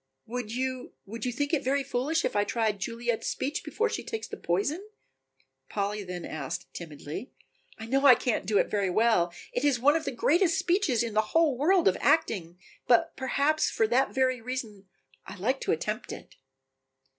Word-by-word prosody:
"Would 240 -1 -5
you 255 +1 -3
would 220 +3 -6
you 250 - 0
think 285 +5 -2
it 290 -3 +2
very 275 +2 +1
foolish 275 +6 0
if - - -2
I 205 - +3
tried 220 -2 -1
Juliet's 235 +2 -2
speech 285 +3 -2
before 460 - 0
she 445 - -4
takes 445 -1 -5
the - - -7
poison?" 240 - -1 0.9
Polly 205 0 -2
then 180 -2 -6
asked 155 +3 -6
timidly. 160 - -7 0.5
"I 225 - -7
know 270 +4 +3
I 255 - +10
can't 245 -2 -1
do 210 -1 +2
it - - +4
very 200 -3 0
well, 200 -3 +3 0.2
it 245 - -1
is 280 -4 +3
one 290 +5 +4
of 320 -1 -1
the - - -1
greatest 335 +9 +2
speeches 350 - +1
in 230 -2 -4
the 215 - +4 0.2
whole 320 -5 +4
world 345 +7 +3
of 190 - +2
acting, 215 - +1 0.3
but 240 -2 +3
perhaps 280 +3 +1
for 225 - +1
that 260 +3 +2
very 255 -2 +1
reason 225 -5 -6 0.4
I - - -8
like 245 +8 -1
to - - 0
attempt 215 +8 -2
it." - - -10
245 Hz, 190 wpm, -28 LUFS, 210-280 Hz, 0.9 s, I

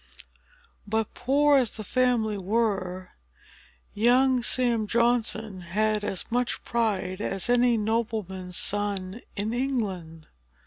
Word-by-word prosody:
But, 220 +1 -1
poor 285 +3 +3
as 250 -4 0
the 215 - -5
family 240 -2 +1
were, 195 -3 -2 0.8
young 250 +3 +3
Sam 235 -3 +1
Johnson 225 -4 +1
had 210 +4 0
as 195 -3 -1
much 245 +1 -1
pride 205 -5 -1
as 195 +3 -1
any 245 -1 +3
nobleman's 210 -5 -2
son 205 0 0
in 215 +2 -1
England. 195 - -3
220 Hz, 105 wpm, -26 LUFS, 195-240 Hz, 0.8 s, poor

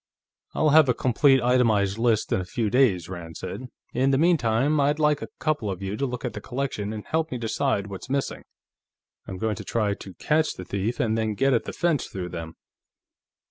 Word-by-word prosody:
"I'll 155 - +3
have 155 -2 +6
a 125 - +3
complete, 135 +1 +3
itemized 110 -5 +2
list 115 -2 +1
in 95 - +2
a - - -4
few 105 +4 -2
days," 110 -10 +3
Rand 85 -3 -8
said. 130 - -6 0.3
"In 130 +1 +2
the 135 - +3
meantime, 145 -3 +2
I'd 145 +1 +2
like 150 -1 +2
a - - -5
couple 150 -9 -1
of 95 0 -5
you 95 +1 -3
to 140 +4 -1
look 125 -1 -5
at - - -3
the - - -6
collection 125 -6 -3
and 110 -1 -6
help 160 0 -1
me 125 - -2
decide 115 -2 -1
what's 100 +4 -8
missing. 140 0 -2 0.9
I'm 95 - -6
going 110 0 -1
to - - -6
try 105 -3 0
to 95 -2 -10
catch 155 - +1
the 95 - -8
thief, 100 +6 -2
and 110 -1 +1
then 110 -1 -1
get 135 +4 +2
at 115 - +1
the - - -4
fence 170 -5 0
through 90 -2 -6
him." 80 -1 -6
115 Hz, 215 wpm, -25 LUFS, 100-140 Hz, 0.9 s, have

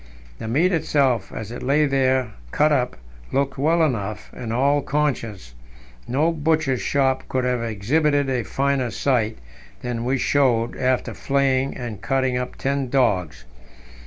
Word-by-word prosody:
The - - -5
meat 155 +11 +2
itself, 140 - +1
as 110 0 -6
it 120 - -7
lay 145 +4 +3
there 130 -3 +1 0.2
cut 150 - +2
up, 125 -4 0 0.3
looked 135 0 0
well 165 +4 +3
enough, 105 -8 -2
in 120 -3 -6
all 140 +5 +2
conscience; 120 - -2 0.5
no 150 +7 +2
butcher's 155 -4 0
shop 135 -2 +1
could 130 -1 0
have 125 -1 0
exhibited 140 +7 +1
a 130 -2 0
finer 135 +3 0
sight 115 -4 0 0.5
than 120 -1 -3
we 130 +3 +1
showed 120 -3 +2
after 130 -1 0
flaying 135 -1 0
and 120 -5 -6
cutting 130 -2 0
up 125 0 -3
ten 135 -1 -1
dogs. 90 - +1
130 Hz, 145 wpm, -22 LUFS, 120-140 Hz, 0.5 s, lay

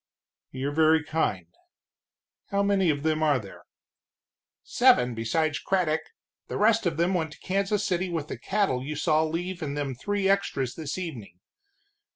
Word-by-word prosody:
"You're 135 +2 -3
very 160 +1 +4
kind. 150 - -1 1.0
How 200 0 0
many 200 -3 +2
of 145 -2 0
them 155 0 +1
are 150 -3 +3
there?" 100 -6 -10 1.0
"Seven 125 0 +4
besides 145 +7 0
Craddock, 175 -5 0 0.5
the - - -4
rest 220 -1 +3
of 165 -2 -2
them 170 +3 +2
went 160 -4 -1
to - - -17
Kansas 200 +2 0
City 185 -1 0
with 160 -4 -3
the - - -6
cattle 190 -11 0
you 150 +3 -4
saw 155 +1 +2
leave 175 +3 -3
in 145 -2 -3
them 145 -2 -2
three 200 +9 -1
extras 175 -10 0
this 155 -1 -5
evening. 125 - -7
160 Hz, 160 wpm, -27 LUFS, 145-185 Hz, 1.0 s, very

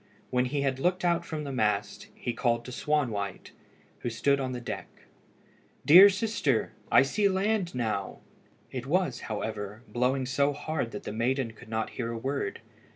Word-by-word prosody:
When 125 0 +2
he 140 +3 -1
had 135 -1 0
looked 180 +4 +1
out 170 0 +2
from 155 -2 -5
the 140 - -5
mast, 110 -5 -1
he 120 - -3
called 120 -1 0
to 125 - -7
Swanwhite, 120 -9 -1 0.5
who - - -3
stood 140 +5 +2
on 130 -1 -2
the 125 - -4
deck 120 - -5 1.0
"Dear 185 +7 +10
sister, 195 - 0 0.2
I - - +7
see 200 +9 +2
land 195 -2 0
now." 110 -5 -2 0.5
It 130 0 -5
was, 175 -5 +1
however, 105 0 -4
blowing 130 +2 0
so 140 +2 +1
hard 145 -3 -3
that 105 - -7
the - - -5
maiden 120 +2 0
could 115 +1 -15
not 110 0 -2
hear 115 -2 -3
a 115 - -4
word. 135 -3 -3
130 Hz, 170 wpm, -28 LUFS, 115-150 Hz, 1.0 s, Dear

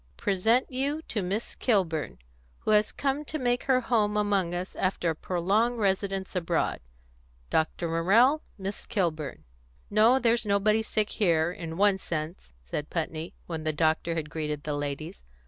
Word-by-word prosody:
Present 220 +8 +2
you 280 +5 -1
to 210 - -1
Miss 195 +5 -3
Kilburn, 180 - 0 0.4
who - - 0
has 210 0 +4
come 280 +1 -1
to 310 - -3
make 245 -3 0
her 260 -2 +3
home 215 -4 +1
among 200 -4 +1
us 180 +2 -5
after 185 -3 0
a - - -4
prolonged 200 +9 +1
residence 195 -2 -1
abroad. 170 -2 0 0.7
Dr. 160 +2 0
Morrell, 215 - +4 0.2
Miss 195 0 -6
Kilburn." 160 - -2 0.5
"No, 220 +5 +5
there's 235 -2 +2
nobody 210 +1 +2
sick 215 -1 -1
here, 170 -5 +2
in 165 -2 -6
one 200 -1 +4
sense," 155 - -5
said 145 - -4
Putney, 165 0 -4
when 160 -2 -5
the 155 0 0
doctor 160 +2 +1
had 150 -2 -4
greeted 150 -2 -3
the 150 - -2
ladies. 145 - -4
190 Hz, 155 wpm, -28 LUFS, 160-220 Hz, 0.7 s, No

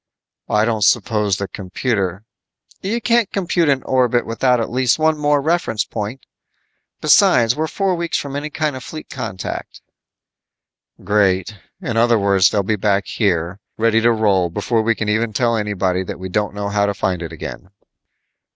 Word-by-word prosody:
"I 105 +1 +3
don't 110 -2 0
suppose 105 -1 +2
the 100 - -3
computer 95 0 -3 0.3
" - - -32
"You 215 +5 -1
can't 235 -3 +2
compute 175 -4 +1
an 135 -2 +1
orbit 125 -2 +1
without 125 +2 +1
at 115 - -3
least 125 0 +2
one 160 0 +2
more 145 -1 +2
reference 155 -7 0
point. 110 +4 -6 0.8
Besides, 115 -1 +5
we're 155 +1 -1
four 195 +2 0
weeks 170 -1 -1
from 140 -1 -5
any 145 +2 -3
kind 155 -2 -2
of 130 - -7
fleet 155 +4 -9
contact." 95 -9 -6 1.2
"Great. 100 -1 +1 0.3
In 120 -10 -3
other 115 0 +4
words, 100 -2 +4
they'll 100 - 0
be 110 +3 0
back 100 0 +1
here, 90 -3 -1 0.2
ready 115 0 +3
to 120 +1 +4
roll 100 -6 +2
before 115 +7 0
we 115 +1 +1
can 105 - -3
even 110 +1 0
tell 115 +2 +1
anybody 100 -4 -1
that - - -6
we 95 0 -7
don't 105 +2 -1
know 100 0 -3
how 100 0 +1
to 100 - -2
find 90 -3 -1
it 85 -2 -6
again." 80 +3 -8
110 Hz, 175 wpm, -19 LUFS, 100-130 Hz, 1.2 s, Besides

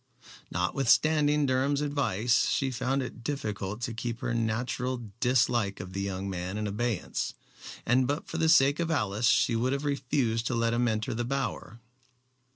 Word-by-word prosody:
Notwithstanding 145 - +2
Durham's 135 +2 +1
advice, 125 -6 +1
she 135 -1 0
found 130 +2 -1
it 120 -2 -8
difficult 105 -6 -3
to 120 -1 -3
keep 115 +1 -4
her 120 - -1
natural 120 +1 -2
dislike 120 -5 +2
of 95 0 -7
the 100 - -2
young 100 0 -3
man 95 +1 -4
in 105 - -2
abeyance, 105 0 -2 0.5
and 125 +2 +3
but 145 +3 -2
for 160 - -4
the 160 0 +3
sake 140 0 +5
of 170 -1 0
Alice 110 -7 +1
she 115 - +3
would 125 +4 +1
have 140 +1 -2
refused 125 -5 0
to 125 - -1
let 115 0 +1
him 120 +1 +2
enter 110 -1 -1
the 120 +2 -2
Bower. 125 -2 -3
120 Hz, 165 wpm, -28 LUFS, 110-135 Hz, 0.5 s, sake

